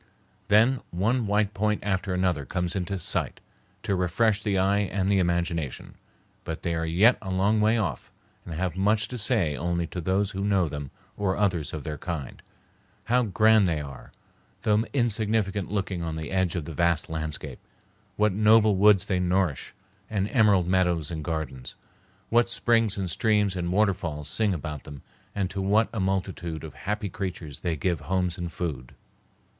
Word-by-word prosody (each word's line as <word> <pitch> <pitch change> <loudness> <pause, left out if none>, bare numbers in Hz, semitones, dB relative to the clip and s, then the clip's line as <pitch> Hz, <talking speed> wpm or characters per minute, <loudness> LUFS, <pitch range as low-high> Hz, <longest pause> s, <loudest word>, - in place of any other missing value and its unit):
Then 115 +5 +4
one 110 +6 0
white 105 +1 +1
point 105 +1 0
after 95 -1 -1
another 90 -5 0
comes 90 +6 -2
into 95 +1 -2
sight 90 - -1 0.4
to 100 - 0
refresh 105 +4 +1
the 100 -3 0
eye 100 +2 +2
and 100 -1 -1
the 100 -1 +3
imagination; 85 -5 -1 0.5
but - - -6
they 85 - -1
are 80 0 -1
yet 100 +10 +4
a 95 - -6
long 100 +4 +2
way 110 +2 +3
off, 90 - -3 0.3
and 85 - -7
have 90 0 -2
much 105 +3 +2
to 125 - -5
say 100 - +1
only 85 +1 -1
to 90 - -6
those 95 +4 0
who 95 0 -4
know 100 -4 +2
them 75 -2 -6 0.3
or 95 -2 0
others 90 -7 0
of 75 -3 -6
their 75 0 -5
kind. 80 -7 -5 0.6
How 125 +4 +2
grand 110 -1 +4
they 80 -3 0
are, 70 -3 -9 0.5
though 105 0 +3
insignificant 110 -6 0
looking 95 -3 -2
on 80 -1 -3
the 80 -1 -5
edge 95 -2 +1
of 85 -4 -3
the 80 - -7
vast 85 0 +1
landscape! 80 -1 -5 0.6
What 105 -2 +2
noble 110 +1 +5
woods 100 -1 +5
they 95 -2 0
nourish, 90 -5 0 0.3
and 100 -2 0
emerald 105 -7 +4
meadows 90 -3 +1
and 80 -2 -4
gardens! 75 -6 -4 0.5
What 120 0 +3
springs 115 -3 +2
and 95 -2 -2
streams 105 +2 +1
and 85 -1 -2
waterfalls 90 -7 0
sing 110 -2 +1
about 75 -4 -5
them 70 -3 -10 0.3
and 100 -2 0
to 100 - -3
what 105 +4 +3
a 115 - -2
multitude 95 -4 -2
of 80 - -8
happy 105 0 -3
creatures 85 -7 -6
they 85 - -1
give 85 +1 -1
homes 90 +3 -1
and 85 -1 -4
food! 70 -10 -5
95 Hz, 175 wpm, -26 LUFS, 85-105 Hz, 0.6 s, noble